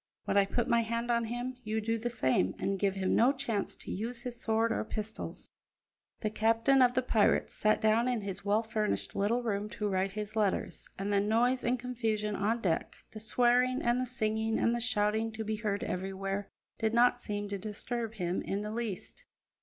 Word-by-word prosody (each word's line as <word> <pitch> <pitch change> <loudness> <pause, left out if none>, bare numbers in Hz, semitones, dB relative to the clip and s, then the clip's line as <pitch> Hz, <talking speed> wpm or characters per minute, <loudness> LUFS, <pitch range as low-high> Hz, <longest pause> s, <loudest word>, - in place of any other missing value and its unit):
When - - 0
I 200 -1 +6
put 240 +4 0
my 235 0 +4
hand 230 +1 -1
on 235 -1 +2
him, 245 +2 -4
you 220 0 -1
do 225 +1 -1
the 240 +2 -2
same, 130 - +1
and 195 0 -1
give 195 -1 +1
him 190 -1 0
no 245 +4 +5
chance 240 -8 -2
to - - -8
use 230 +4 -3
his 245 -1 -5
sword 225 +1 +2
or - - 0
pistols." 220 0 -4 0.7
The 215 - -1
captain 230 +5 +3
of 245 0 +5
the 255 - +2
pirates 220 -4 +2
sat 215 0 +2
down 220 +3 +3
in 245 -3 0
his 195 -1 -5
well 205 +3 +2
furnished 220 -1 -1
little 230 +5 +1
room 210 -2 -1
to 210 - 0
write 190 0 0
his 210 0 -5
letters, 210 -3 -1
and 200 +1 -2
the 200 - +4
noise 235 +5 +2
and 245 +2 +1
confusion 225 -4 -2
on 220 +4 0
deck, 170 -6 -1 0.2
the 215 - -8
swearing 245 +3 +2
and 240 +1 +2
the 255 - -2
singing 220 -2 0
and 230 - +2
the 240 - -1
shouting 220 -1 +1
to 220 0 -4
be 215 0 -2
heard 210 -2 -2
everywhere, 195 +2 -3 0.3
did 220 +1 +1
not 245 +1 +4
seem 205 -1 -3
to 200 -1 -3
disturb 225 +3 -4
him 180 -2 -1
in 200 +1 -2
the 210 0 -4
least. 230 - -5
220 Hz, 205 wpm, -31 LUFS, 205-235 Hz, 0.7 s, I